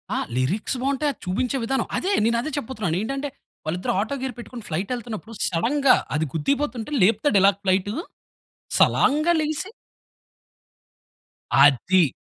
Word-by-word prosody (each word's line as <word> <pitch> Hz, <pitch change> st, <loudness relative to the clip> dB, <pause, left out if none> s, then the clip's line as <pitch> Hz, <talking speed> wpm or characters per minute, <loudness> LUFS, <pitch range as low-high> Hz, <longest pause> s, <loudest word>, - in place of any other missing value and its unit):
ఆ! -, -, 0 dB, 0.2 s
లిరిక్స్ 185 Hz, -, 0 dB
బావుంటాయి 280 Hz, +2 st, 0 dB
అది -, -, -30 dB
చూపించే 245 Hz, +9 st, -1 dB
విధానం. 265 Hz, +3 st, -1 dB
అదే 380 Hz, -, -1 dB
నేనదే 235 Hz, +6 st, 0 dB
చెప్పబోతున్నాను. 220 Hz, -, -2 dB
ఏంటంటే 275 Hz, +6 st, -3 dB, 0.4 s
వాళ్ళిద్దరు 175 Hz, +4 st, -1 dB
ఆటో 225 Hz, +7 st, -1 dB
గేర్ 260 Hz, -1 st, -3 dB
పెట్టుకొని 240 Hz, -1 st, -9 dB
ఫ్లైట్ 180 Hz, +8 st, -2 dB
ఎళ్తున్నప్పుడు 230 Hz, -2 st, -7 dB
సడెన్‌గా 255 Hz, -, +3 dB, 0.2 s
అది 155 Hz, +2 st, +1 dB
గుద్దేయపోతుంటే 240 Hz, -, -1 dB
లేపుతాడు 215 Hz, +3 st, +3 dB
ఇలా 195 Hz, +1 st, +6 dB
ఫ్లైటు. 190 Hz, +1 st, +1 dB, 0.9 s
సలాన్‌గా 305 Hz, +5 st, +4 dB
లేగిసి 310 Hz, +6 st, -2 dB, 1.8 s
అది. 145 Hz, +4 st, +4 dB
230 Hz, 120 wpm, -23 LUFS, 185-275 Hz, 1.8 s, ఇలా